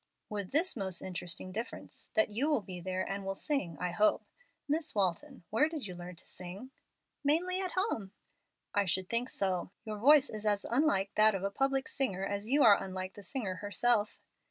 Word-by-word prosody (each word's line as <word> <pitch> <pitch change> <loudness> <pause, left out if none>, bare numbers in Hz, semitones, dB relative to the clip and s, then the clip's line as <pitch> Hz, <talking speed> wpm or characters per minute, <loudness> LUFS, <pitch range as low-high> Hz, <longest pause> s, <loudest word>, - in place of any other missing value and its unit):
"With 205 -3 -4
this 330 +6 +2
most 190 -5 -1
interesting 180 0 -5
difference, 225 +5 -5
that 325 -9 +4
you 260 +9 +2
will 285 -9 +2
be 180 -2 -7
there 185 +1 -2
and 195 0 -3
will 195 0 -3
sing, 195 - -2
I 180 0 -1
hope. 210 +5 +2 0.4
Miss 305 -1 0
Walton, 205 - -1
where 295 +9 +3
did 315 -7 -5
you 185 - -6
learn 175 0 -8
to - - -12
sing?" 185 +8 -7 0.5
"Mainly 350 +6 +2
at 370 -2 -3
home." 370 - -1 0.6
"I 205 0 +2
should 185 +1 -1
think 240 +2 0
so. 185 -3 0 0.2
Your 215 -1 -5
voice 290 +4 +6
is 215 -1 -6
as 205 -1 +1
unlike 235 -7 +2
that 215 -1 +6
of 190 - -3
a 200 - -1
public 270 +3 0
singer 195 -9 -1
as 200 +2 -3
you 285 +2 +5
are 205 -3 +7
unlike 185 0 -5
the 205 - -11
singer 200 -3 -3
herself." 210 +1 +1
205 Hz, 195 wpm, -32 LUFS, 190-270 Hz, 0.6 s, are